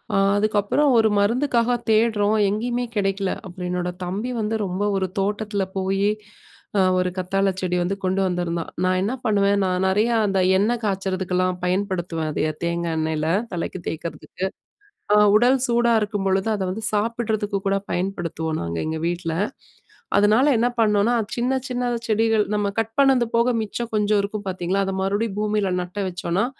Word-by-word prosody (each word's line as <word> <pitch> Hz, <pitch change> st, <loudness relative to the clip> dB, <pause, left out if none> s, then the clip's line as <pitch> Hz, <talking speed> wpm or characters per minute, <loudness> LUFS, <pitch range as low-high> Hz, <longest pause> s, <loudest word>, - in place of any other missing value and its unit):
அ -, -, +3 dB, 0.2 s
அதுக்கப்புறம் 215 Hz, +7 st, +2 dB
ஒரு 220 Hz, -1 st, +4 dB
மருந்துக்காக 240 Hz, +2 st, +2 dB, 0.2 s
தேடுறோம், 215 Hz, -1 st, +3 dB
எங்கேயுமே 240 Hz, +4 st, -1 dB
கிடைக்கல. 195 Hz, -1 st, 0 dB
அப்புறம் 180 Hz, -1 st, -6 dB
என்னோட 180 Hz, 0 st, -1 dB
தம்பி 205 Hz, +8 st, -3 dB
வந்து 215 Hz, +1 st, -1 dB
ரொம்ப 185 Hz, +2 st, -2 dB
ஒரு 190 Hz, -1 st, 0 dB
தோட்டத்தில 205 Hz, 0 st, -1 dB
போயி, 195 Hz, +1 st, +1 dB, 0.7 s
அ -, -, +5 dB, 0.2 s
ஒரு 180 Hz, 0 st, +1 dB
கத்தாழை 195 Hz, +2 st, +1 dB
செடி 180 Hz, -1 st, -1 dB
வந்து 190 Hz, +3 st, -1 dB
கொண்டு 185 Hz, +1 st, +1 dB
வந்திருந்தான். 175 Hz, -2 st, -2 dB, 0.2 s
நான் 185 Hz, 0 st, +2 dB
என்ன 210 Hz, +5 st, -1 dB
பண்ணுவேன், 200 Hz, -1 st, +3 dB
நான் 185 Hz, 0 st, 0 dB
நெறையா 215 Hz, +5 st, +2 dB
அந்த 195 Hz, -1 st, +1 dB, 0.2 s
எண்ண 210 Hz, +4 st, +2 dB
காய்ச்சறதுக்கெல்லாம் 185 Hz, -2 st, -1 dB
பயன்படுத்துவேன். 180 Hz, -4 st, -1 dB
அத 155 Hz, +1 st, 0 dB
தேங்காய் 170 Hz, -1 st, -1 dB
எண்ணெயில, 155 Hz, 0 st, -1 dB, 0.3 s
தலைக்கு 175 Hz, +1 st, -3 dB
தேய்க்கிறதுக்கு. 170 Hz, +3 st, -5 dB, 0.7 s
அ -, -, +6 dB, 0.2 s
உடல் 245 Hz, +4 st, +4 dB
சூடா 235 Hz, 0 st, +3 dB
இருக்கும்பொழுது, 195 Hz, -2 st, 0 dB
அதை 200 Hz, -, -2 dB
வந்து 220 Hz, +4 st, -5 dB
சாப்பிடுறதுக்கு 215 Hz, -1 st, -1 dB
கூட 195 Hz, 0 st, +2 dB
பயன்படுத்துவோம் 170 Hz, -4 st, -2 dB
நாங்க 85 Hz, 0 st, -4 dB
எங்க 160 Hz, 0 st, -2 dB
வீட்ல. 170 Hz, -1 st, -2 dB, 0.8 s
அதனால 215 Hz, +6 st, +4 dB
என்ன 235 Hz, +2 st, +2 dB
பண்ணோம்னா, 210 Hz, +1 st, +3 dB, 0.2 s
சின்ன, 245 Hz, +2 st, 0 dB
சின்ன 250 Hz, -1 st, -2 dB, 0.2 s
செடிகள். 220 Hz, 0 st, +2 dB
நம்ம 205 Hz, -1 st, +1 dB
கட் 225 Hz, 0 st, -2 dB
பண்ணது 270 Hz, -3 st, +5 dB
போக 235 Hz, +2 st, +3 dB
மிச்சம் 230 Hz, +2 st, -4 dB
கொஞ்சம் 210 Hz, 0 st, +2 dB
இருக்கும் 205 Hz, +1 st, -5 dB
பாத்தீங்களா, 185 Hz, +1 st, -1 dB
அத 195 Hz, -, -2 dB
மறுபடியும் 200 Hz, +2 st, -1 dB
பூமியில 210 Hz, -2 st, 0 dB
நட்ட 180 Hz, +3 st, -6 dB
வச்சோம்னா, 180 Hz, +2 st, -1 dB
200 Hz, 150 wpm, -23 LUFS, 185-220 Hz, 0.8 s, அ